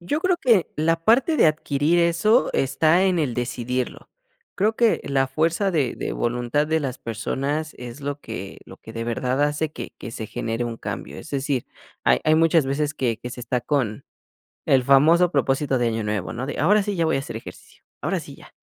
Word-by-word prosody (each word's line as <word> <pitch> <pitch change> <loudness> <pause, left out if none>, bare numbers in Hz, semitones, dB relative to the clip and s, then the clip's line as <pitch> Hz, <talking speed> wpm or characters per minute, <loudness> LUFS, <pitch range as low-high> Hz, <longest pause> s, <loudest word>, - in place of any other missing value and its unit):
yo 290 - -2
creo 365 -1 +1
que 225 - +3
la 165 +2 0
parte 255 +8 +4
de - - +5
adquirir 155 +1 +2
eso 170 +8 +3
está 155 +7 +3
en 185 -3 +2
el 135 -7 0
decidirlo. 125 +1 -3 0.5
Creo 215 +3 +1
que 230 -1 +2
la 135 -1 +1
fuerza 165 +8 0
de 145 -8 0
de - - -3
voluntad 120 +5 0
de 160 +1 +1
las 135 -4 -3
personas 140 +7 -3
es 125 +2 -9
lo 145 0 -4
que 100 -3 -7
lo - - -13
que 110 - -12
de 115 0 -3
verdad 125 +4 -1
hace 150 +1 0
que - - -8
que 115 - -7
se 110 -1 -6
genere 115 +1 -3
un 115 -1 -5
cambio. - - -6
Es - - -10
decir, 135 -2 -2 0.4
hay - - +4
hay 155 0 +4
muchas 165 -1 +4
veces 145 +2 -1
que 120 -6 -1
que 125 - -6
se 125 0 -8
está 125 0 -1
con 125 -5 -1 0.6
el 130 -2 +4
famoso 165 +6 +5
propósito 135 -1 +1
de 120 -1 +1
año 110 -1 -2
nuevo, 105 -4 -2
¿no? 125 +3 -4
De 145 - -4
ahora 200 +6 +4
sí 205 - -2
ya 165 -3 +1
voy 160 - +1
a - - 0
hacer 135 - -6
ejercicio, 110 - -11 0.2
ahora - - -1
sí - - -11
ya. - - -16
140 Hz, 210 wpm, -23 LUFS, 125-165 Hz, 0.6 s, de